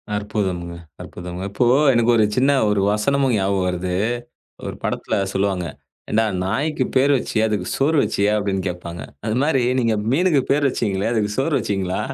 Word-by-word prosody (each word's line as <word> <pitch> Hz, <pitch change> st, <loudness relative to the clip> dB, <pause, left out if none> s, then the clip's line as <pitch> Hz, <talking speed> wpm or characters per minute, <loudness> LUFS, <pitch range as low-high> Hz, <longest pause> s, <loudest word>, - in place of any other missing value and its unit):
அற்புதமங்க, 95 Hz, -4 st, -3 dB, 0.3 s
அற்புதமங்க. 90 Hz, +1 st, -7 dB
இப்போ, 120 Hz, +5 st, +1 dB, 0.3 s
எனக்கு 120 Hz, 0 st, +3 dB
ஒரு 110 Hz, -, +4 dB
சின்ன 135 Hz, +3 st, +3 dB, 0.2 s
ஒரு 105 Hz, -1 st, +1 dB
வசனம் 135 Hz, +7 st, +1 dB
ஞாபகம் 95 Hz, -2 st, 0 dB
வருது. 90 Hz, 0 st, -2 dB, 0.7 s
ஒரு -, -, -5 dB
படத்துல -, -, -2 dB, 0.2 s
சொல்லுவாங்க. 95 Hz, -2 st, 0 dB, 0.5 s
ஏன்டா, 110 Hz, +1 st, +3 dB, 0.2 s
நாய்க்கு 135 Hz, +9 st, -1 dB
பேரு 135 Hz, +2 st, +4 dB
வச்சியே, 110 Hz, -3 st, -1 dB
அதுக்கு 105 Hz, -4 st, -2 dB
சோறு 150 Hz, +4 st, +2 dB
வச்சியா? 100 Hz, +1 st, +1 dB
அப்படின்னு 100 Hz, -2 st, -1 dB
கேப்பாங்க. 85 Hz, -2 st, -6 dB, 0.2 s
அது 110 Hz, 0 st, 0 dB
மாரி, 135 Hz, -4 st, +2 dB, 0.2 s
நீங்க 115 Hz, -3 st, +1 dB, 0.2 s
மீனுக்குப் 150 Hz, -4 st, +2 dB
பேரு 145 Hz, +1 st, +2 dB
வச்சீங்களே, 100 Hz, -4 st, -1 dB
அதுக்கு 105 Hz, -2 st, 0 dB
சோறு 140 Hz, +4 st, 0 dB
வச்சீங்களா? 95 Hz, -2 st, -2 dB
105 Hz, 155 wpm, -21 LUFS, 95-130 Hz, 0.7 s, ஒரு